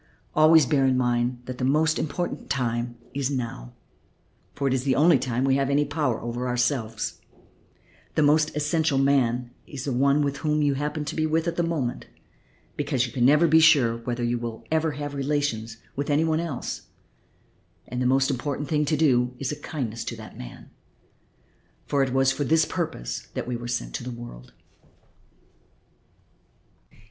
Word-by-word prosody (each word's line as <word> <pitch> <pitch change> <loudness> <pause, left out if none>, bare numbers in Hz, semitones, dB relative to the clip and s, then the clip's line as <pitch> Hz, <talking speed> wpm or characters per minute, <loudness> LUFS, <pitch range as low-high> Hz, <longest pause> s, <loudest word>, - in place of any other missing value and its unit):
Always 155 0 +6
bear 135 -1 +2
in 130 -1 +2
mind 120 0 0
that 130 0 -7
the - - -2
most 155 +4 +2
important 175 +4 -3
time 120 -2 -1 0.2
is 140 -1 -1
now, 115 - -4 0.8
for 140 - -1
it 130 - +2
is 130 -1 0
the 135 -1 +2
only 155 0 +5
time 125 0 -1
we 135 0 +3
have 135 -1 0
any 145 +1 +2
power 145 -5 -1
over 120 +2 -3
ourselves; 125 -2 -1 0.9
the 155 - +3
most 150 +1 +3
essential 150 -1 +1
man 125 -3 +2 0.2
is 140 -3 -7
the 140 - -1
one 140 +3 +3
with 140 -1 -1
whom 150 0 0
you 145 -1 +3
happen 150 +2 -3
to 140 - -4
be 155 - +1
at 165 +2 0
the 175 - +1
moment, 160 -8 -2 0.7
because 125 -1 0
you 120 - -8
can 120 -2 +2
never 150 +5 +5
be 160 +1 +6
sure 145 -8 +5
whether 120 +1 -4
you 120 0 0
will 115 -1 -6
ever 160 -1 +1
have 145 0 -5
relations 135 -6 -2 0.2
with 140 +2 -3
any 145 +2 +3
one 160 -1 +1
else, 165 -7 -4 1.0
and 125 +1 -4
the 125 - +2
most 135 +2 +3
essential 140 +2 -3
thing 150 0 +1
to 150 +1 +1
do 125 -5 +2
is 135 +1 -3
a - - -3
kindness 120 -8 -4
to 115 - -4
that 110 -1 -11
man, - - -10 1.1
for 140 - +1
it 135 -1 +1
was 135 +1 +3
for 145 - -2
this 160 +2 +3
purpose 160 - -4 0.2
we 125 - -3
were 120 0 -6
sent - - -3
into - - -9
the 120 -1 -6
world." 60 - -10
135 Hz, 175 wpm, -25 LUFS, 120-150 Hz, 1.1 s, Always